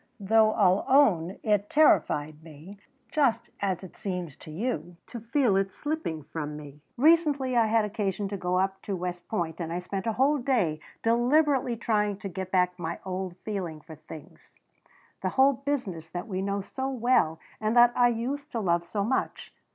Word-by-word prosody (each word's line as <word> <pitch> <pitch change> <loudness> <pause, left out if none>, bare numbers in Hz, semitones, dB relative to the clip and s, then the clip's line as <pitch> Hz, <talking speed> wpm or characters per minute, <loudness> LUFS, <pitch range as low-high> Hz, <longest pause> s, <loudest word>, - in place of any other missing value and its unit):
"Though 215 +2 +4
I'll 190 -2 +3
own 195 - +3
it 210 -1 +1
terrified 155 - +3
me, 165 +6 -12 0.3
just 235 -6 +1
as 190 -2 -1
it 185 - -11
seems 180 -7 -5
to - - -13
you, 175 -1 -4
to 240 - -8
feel 235 -1 +1
it 195 0 +1
slipping 290 - -4
from 150 0 -5
me. 145 -1 -11 0.2
Recently 290 -3 +3
I 230 -2 +4
had 220 0 +2
occasion 205 -2 -2
to 200 - -4
go 180 -1 -1
up 190 +1 0
to 200 - -3
West 180 -1 -5
Point 170 -6 -3
and 165 -1 -4
I 170 - -2
spent 190 +3 -4
a 225 - +1
whole 280 +5 +2
day 225 - +1 0.2
deliberately 250 +2 +2
trying 210 -3 0
to 200 -1 -6
get 190 +1 -5
back 180 -1 +1
my 170 0 -3
old 185 -1 -4
feeling 185 -7 -4
for 160 +2 -12
things 155 0 -13 0.7
the - - 0
whole 270 +1 +6
business 245 - -4
that 175 +2 -5
we 190 -3 -3
know 200 +1 -1
so 265 +7 -4
well 240 -11 +2 0.2
and 220 +2 0
that 240 0 +7
I 245 - +5
used 260 +5 -3
to 235 - -1
love 170 -4 +1
so 200 +3 -2
much. 260 +6 -2
200 Hz, 180 wpm, -27 LUFS, 175-240 Hz, 0.7 s, that